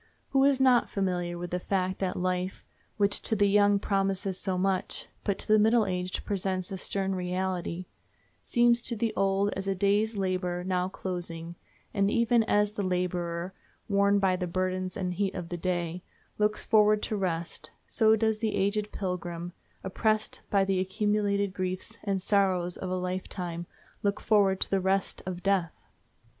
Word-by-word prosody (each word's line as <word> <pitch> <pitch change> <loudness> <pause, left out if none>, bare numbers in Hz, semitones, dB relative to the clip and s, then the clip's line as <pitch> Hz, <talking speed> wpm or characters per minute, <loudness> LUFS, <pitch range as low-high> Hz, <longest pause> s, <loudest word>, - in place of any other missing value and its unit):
Who 270 -1 +3
is 280 -2 +4
not 255 -3 +4
familiar 180 -3 -1
with 175 0 -6
the 180 - -1
fact 185 0 -1
that 185 -2 -1
life, 180 +1 -2 0.3
which 205 -1 +2
to 220 - -1
the 205 -1 +3
young 205 0 +4
promises 195 -1 0
so 185 -1 -1
much, 190 0 -1 0.2
but 200 -2 0
to - - -7
the 215 0 +5
middle 220 +1 +4
aged 180 -1 -3
presents 190 -1 -2
a 190 - -3
stern 195 0 -1
reality, 180 -1 -2 0.6
seems 240 -1 +3
to 235 - -1
the 225 0 -1
old 195 +1 +2
as 195 0 -5
a 195 - +1
day's 205 +3 +1
labor 180 -2 -1
now 185 0 0
closing; 170 -3 -5 0.4
and 200 -1 +2
even 235 +1 +3
as 210 -1 +2
the 210 - -3
laborer, 180 -1 -2 0.3
worn 200 0 +3
by 190 -2 +3
the 180 -1 -3
burdens 185 +1 -2
and 180 -2 -2
heat 195 +1 -1
of 170 -2 -5
the 175 - -3
day, 175 -1 -2 0.4
looks 210 0 +1
forward 210 -1 +4
to 215 - -1
rest, 170 -4 -3 0.2
so 220 -1 +4
does 220 0 +1
the 220 -1 -1
aged 205 +2 0
pilgrim, 175 -2 -4 0.3
oppressed 215 +3 0
by 195 -1 +3
the 195 -1 +1
accumulated 200 0 0
griefs 185 +4 -3
and 195 -3 -1
sorrows 185 -4 +2
of 185 - -5
a 185 - -1
life 185 0 -3
time, 175 -2 -5 0.3
look 200 0 0
forward 200 -3 +3
to - - -2
the 195 -1 +2
rest 190 +1 0
of 180 -1 -5
death? 190 -4 +1
190 Hz, 175 wpm, -28 LUFS, 180-205 Hz, 0.6 s, the